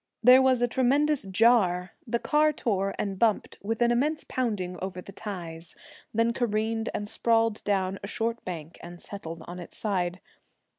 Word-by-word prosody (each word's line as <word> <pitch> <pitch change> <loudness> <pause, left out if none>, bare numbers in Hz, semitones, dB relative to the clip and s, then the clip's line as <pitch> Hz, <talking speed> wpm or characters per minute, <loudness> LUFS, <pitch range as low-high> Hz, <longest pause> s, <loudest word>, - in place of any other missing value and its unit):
There 250 +2 +8
was 260 -2 +3
a - - +4
tremendous 270 0 +2
jar; 190 -4 +3 0.2
the 235 +1 +1
car 305 +5 +3
tore 195 -8 -1
and 195 -2 -3
bumped 220 -3 +1
with 225 +3 0
an 240 - +3
immense 295 +6 +1
pounding 200 -8 -2
over 185 -1 -4
the 190 - -9
ties, 170 -6 -7 0.4
then 230 +1 +2
careened 225 -1 -1
and 205 - -4
sprawled 225 0 +1
down 195 -1 0
a - - -4
short 230 +2 -2
bank 165 -2 -7
and 175 0 -10
settled 165 -5 -8
on 175 +1 -8
its 175 - -9
side. 185 -4 -1
210 Hz, 165 wpm, -27 LUFS, 185-235 Hz, 0.4 s, There